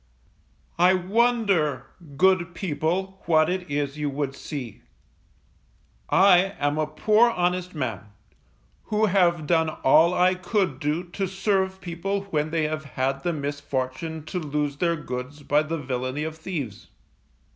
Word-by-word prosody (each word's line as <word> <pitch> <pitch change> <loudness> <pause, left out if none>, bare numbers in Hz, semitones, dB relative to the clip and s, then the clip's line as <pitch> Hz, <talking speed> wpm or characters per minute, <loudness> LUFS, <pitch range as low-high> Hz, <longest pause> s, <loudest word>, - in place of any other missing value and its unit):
_I 180 0 +4
wonder, 200 - +2 0.3
good 185 -1 +3
people, 190 +3 -2
what 160 0 +4
it 185 -2 -3
is 145 0 -2
you 150 -1 -1
would 140 -1 -3
see? 140 -5 -7 1.3
I 190 0 +5
am 145 +1 0
a 155 - +1
poor 220 +7 +3
honest 180 -3 -1
man, 110 -9 -3 0.8
who 215 0 +1
have 175 -5 +2
done 160 0 +2
all 160 +4 +4
I 180 +1 +4
could 180 - -1
do 150 +4 -1
to 185 +2 -4
serve 190 0 -1
people 195 +2 -3
when 150 0 0
they 160 0 0
have 155 0 -2
had 135 0 -2
the 175 - -1
misfortune 145 +1 -4
to 180 - -3
lose 150 -2 -2
their 170 +1 +1
goods 140 0 -6
by 145 +1 +3
the 160 +2 -3
villainy 130 0 -3
of 160 0 -4
thieves. 155 - -6
160 Hz, 140 wpm, -25 LUFS, 145-185 Hz, 1.3 s, I